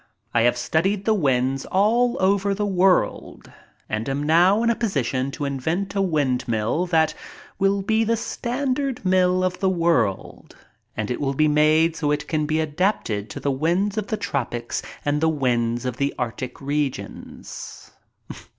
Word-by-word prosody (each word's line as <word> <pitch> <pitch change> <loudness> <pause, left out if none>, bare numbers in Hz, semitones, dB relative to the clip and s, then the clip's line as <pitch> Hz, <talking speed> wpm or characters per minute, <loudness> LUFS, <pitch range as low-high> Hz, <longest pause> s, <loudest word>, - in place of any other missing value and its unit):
I 115 - +3
have 120 +1 +3
studied 185 +11 0
the 220 - +3
winds 135 -6 +1
all 235 +5 +2
over 195 +1 +2
the 205 +1 -1
world 190 -1 +1 0.4
and 110 +3 -3
am 140 +2 -2
now 175 +8 +4
in 235 - +3
a - - 0
position 135 - -1
to 145 +1 -4
invent 160 +8 -2
a 200 - 0
windmill 130 - 0
that 160 -2 +2 0.5
will 195 0 +2
be 220 +3 +2
the 230 +1 +1
standard 260 +1 -2
mill 185 0 +3
of 180 0 -1
the 190 - +2
world, 170 - -1 0.4
and 110 +1 -2
it 125 - -3
will 135 -1 -1
be 155 +2 +3
made 155 +2 +3
so 150 -3 -1
it 150 0 -1
can 155 -2 -1
be 155 +1 0
adapted 150 - -1
to - - -6
the 140 - -1
winds 175 +9 0
of 215 -2 -2
the 215 - -2
tropics 120 - -3 0.2
and 145 +1 0
the 160 - +3
winds 120 -5 0
of 125 -1 -3
the 140 +1 -1
arctic 125 +1 -4
regions. 140 -7 -5
160 Hz, 165 wpm, -23 LUFS, 135-195 Hz, 0.5 s, now